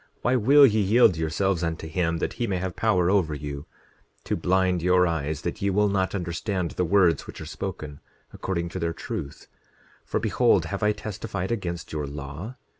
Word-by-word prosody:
Why 125 - +2
will 140 +5 +7
ye 110 -4 +3
yield 105 -1 +5
yourselves 80 +3 0
unto 80 -1 -3
him 85 0 0
that - - -2
he 120 - +1
may 95 - -1
have 90 -1 -4
power 95 -5 +2
over 85 -7 +2
you, 70 +1 -6 0.6
to - - -1
blind 90 -1 +1
your 90 +1 +4
eyes, 80 -2 -2
that 85 +4 -4
ye 100 - +1
will 105 +2 +2
not 95 0 0
understand 90 0 -2
the 90 - -1
words 90 -3 +3
which - - -9
are - - -7
spoken, 75 -2 -6 0.3
according 85 -3 -3
to 95 - -5
their 85 -1 -1
truth? 70 -3 -6 0.6
10:26 - - -33
For - - 0
behold, - - +2
have - - -4
I 105 - +3
testified 100 -2 -5
against 85 -8 -4
your 75 -2 -2
law? 75 - -7
90 Hz, 190 wpm, -25 LUFS, 80-100 Hz, 0.6 s, will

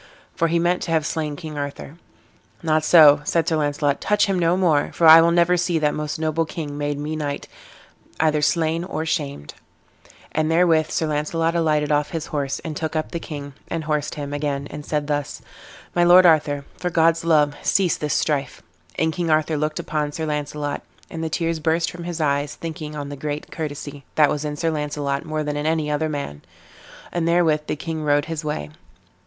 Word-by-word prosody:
for 165 - +1
he 170 +1 +1
meant 175 +2 +1
to - - -4
have 160 -2 +1
slain 155 -2 -2
King 155 -2 -7
Arthur. 145 +2 -6 0.6
"Not 155 -1 +2
so," 150 -3 +7
said 165 +2 0
Sir 160 - +1
Launcelot, 145 -1 0
"touch 210 0 +2
him 195 -2 0
no 170 +1 +2
more, 165 -6 +2
for 170 - +1
I 160 +1 +10
will 165 - +4
never 175 +1 +3
see 175 -1 0
that 150 -1 +1
most 150 0 -3
noble 160 +1 0
king 160 -1 -5
that - - -7
made 145 0 -2
me 150 +2 -4
knight 145 -2 -4 0.7
either 155 -1 +2
slain 165 +2 +1
or 160 -3 -4
shamed;" 140 - -3 0.8
and 155 0 0
therewith 165 -2 +3
Sir 160 - 0
Launcelot 155 +2 0
alighted 155 -3 +1
off 145 0 +1
his 160 -2 -4
horse, 140 -2 -1
and 160 -2 -6
took 160 +1 -3
up 155 - -2
the 170 - -3
king, 145 -3 -7
and 165 -1 -3
horsed 150 -1 -2
him 145 -1 -5
again, 145 -1 -2
and 150 0 -7
said 150 0 -2
thus: 145 -1 -2 0.5
"My 175 - +3
lord 180 +1 +7
Arthur, 145 -4 +3
for 180 - -1
God's 165 -1 +3
love, 150 -3 +3
cease 185 -4 +2
this 150 -1 -2
strife." 140 -4 -1 0.3
And 160 0 +1
King 175 -1 -2
Arthur 155 0 +2
looked 155 +1 -1
upon 150 -1 -2
Sir 160 - -3
Launcelot, 150 -1 -3 0.3
and 165 -1 -5
the 160 - -2
tears 165 0 -1
burst 165 +1 +1
from 175 -1 -8
his 175 -1 -4
eyes, 145 -1 0
thinking 155 -2 -6
on 145 -1 -5
the 145 - -6
great 145 +2 -5
courtesy 145 -2 -6
that 150 -2 +5
was 150 - -2
in 150 0 -3
Sir 165 +2 0
Launcelot 145 -2 -2
more 155 -1 -2
than 150 0 -3
in 145 +1 -2
any 155 -2 0
other 155 +1 0
man; 140 - -5 0.7
and 170 -1 -1
therewith 165 -3 +2
the - - -1
king 160 +1 -5
rode 145 0 +2
his 165 -1 -4
way. 75 - -4
155 Hz, 205 wpm, -22 LUFS, 145-165 Hz, 0.8 s, I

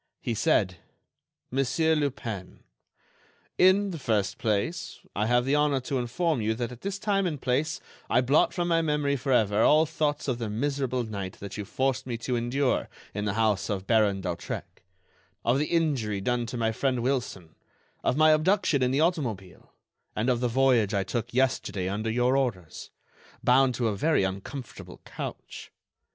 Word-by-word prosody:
He 120 - -2
said: 95 -3 +1 0.7
"Monsieur 135 +5 +1
Lupin, 120 -10 -4 1.0
in 190 +2 +5
the 165 - -6
first 105 -6 0
place 115 - -2 0.2
I 105 +2 0
have 120 +1 +3
the 135 - +1
honor 150 -2 +3
to 130 +1 -2
inform 130 +4 0
you 110 +1 0
that 120 +1 -3
at 125 - -11
this 200 0 -3
time 195 -2 +1
and 150 -5 -3
place 135 +5 0 0.3
I 125 - +4
blot 135 +4 +3
from 175 -1 -2
my 165 -1 +3
memory 150 -3 0
forever 115 -6 +2
all 155 +6 +5
thoughts 150 -2 -1
of 125 -3 -1
the 115 -2 -3
miserable 130 +2 -1
night 100 -4 -5
that 100 -1 -8
you 105 - -5
forced 130 +3 -1
me 120 -2 -3
to 125 +2 -2
endure 125 +3 0 0.2
in 105 0 -3
the 100 -2 -1
house 110 -3 +1
of 95 -2 -2
Baron 105 -4 +2
d'Hautrec, 90 -2 -5 0.6
of 125 +4 +3
the 150 - +1
injury 140 - 0
done 120 +3 -1
to 125 - -5
my 115 -1 +1
friend 125 +1 -1
Wilson, 120 -11 -2 0.5
of 125 - +1
my 155 0 +6
abduction 160 -1 +2
in 125 - +3
the 135 +3 +1
automobile, 120 - -2 0.4
and 115 +4 +1
of 120 - 0
the 125 - +1
voyage 120 -4 +3
I 100 - +1
took 115 +5 -3
yesterday 120 -7 0
under 105 +3 -2
your 125 +3 +2
orders, 115 -12 -2 0.5
bound 130 0 +4
to 120 0 0
a 105 - -1
very 150 +2 +2
uncomfortable 100 +7 -6
couch. - - -8
125 Hz, 170 wpm, -27 LUFS, 110-145 Hz, 1.0 s, my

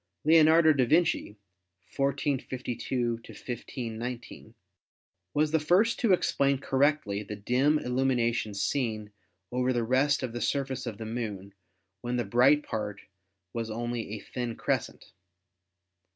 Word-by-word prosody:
Leonardo 160 0 +6
da 135 -3 +2
Vinci 160 -5 +1 0.6
(1452 130 -3 -1
1519) 120 -1 -7 0.8
was 150 +1 +2
the 160 - +3
first 185 +9 +3
to 230 -5 +2
explain 140 -6 +2
correctly 135 -6 +1
the 105 0 -6
dim 125 +9 +2
illumination 120 -5 0
seen 110 -1 -1 0.4
over 125 +1 +1
the 120 -2 0
rest 135 +4 +2
of 125 -3 -3
the 120 - -4
surface 135 -3 -1
of 110 -3 -5
the 110 - -6
Moon 105 -4 -5 0.5
when 120 +1 -2
the 120 -2 0
bright 135 +5 +4
part 105 -3 -4 0.5
was 115 -1 -3
only 120 0 -3
a - - -6
thin 120 +2 -5
crescent. - - -3
125 Hz, 125 wpm, -28 LUFS, 115-140 Hz, 0.8 s, Leonardo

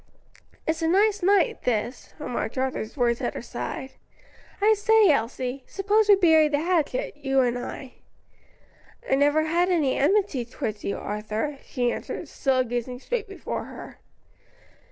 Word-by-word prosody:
"It's 320 +1 -1
a 325 - +1
nice 410 +4 +3
night, 405 +5 +3
this," 235 +1 -2
remarked 250 -5 -4
Arthur's 260 -4 -2
voice 240 -3 +1
at - - -2
her - - -4
side, 265 0 -5 0.7
"I 425 +2 +5
say, 430 -2 +5
Elsie, 255 +1 -2
suppose 410 +2 +1
we 405 - +9
bury 320 -5 +5
the 295 -1 0
hatchet, 365 +9 0
you 270 -2 +1
and 245 -1 +1
I." 250 +1 -6 1.1
"I - - +1
never 290 +3 +3
had 340 +3 +1
any 310 -7 +2
enmity 330 - +2
towards 225 -3 -5
you, 200 - -2
Arthur," 215 +7 -4
she 245 -2 -1
answered, - - -5
still 265 -3 +1
gazing 245 +1 -4
straight 455 - -3
before 395 - -5
her. - - -11
290 Hz, 150 wpm, -25 LUFS, 250-390 Hz, 1.1 s, we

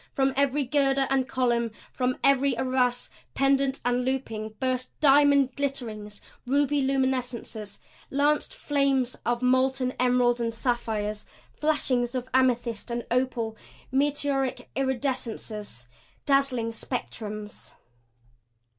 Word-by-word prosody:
From 270 0 +2
every 280 +1 +2
girder 270 0 +2
and 265 -1 +2
column, 240 -3 +1 0.2
from 255 0 0
every 275 -2 +3
arras, 250 -1 0 0.2
pendent 275 0 +2
and 245 0 +1
looping, 225 -5 -3
burst 255 -1 -1
diamond 280 -2 +5
glitterings, 225 -7 -4 0.3
ruby 285 +2 +2
luminescences, 255 -5 -1 0.3
lanced 290 +2 +1
flames 275 - +1
of 240 +1 0
molten 255 0 +2
emerald 245 -1 +3
and 230 -1 -2
sapphires, 220 -4 -2 0.3
flashings 260 -5 0
of 255 0 -3
amethyst 245 -3 +1
and 235 0 -3
opal, 245 -3 0 0.4
meteoric 275 -1 0
iridescences, 240 - -3 0.4
dazzling 275 -5 +2
spectrums. 215 -3 -6
255 Hz, 100 wpm, -27 LUFS, 235-275 Hz, 0.4 s, diamond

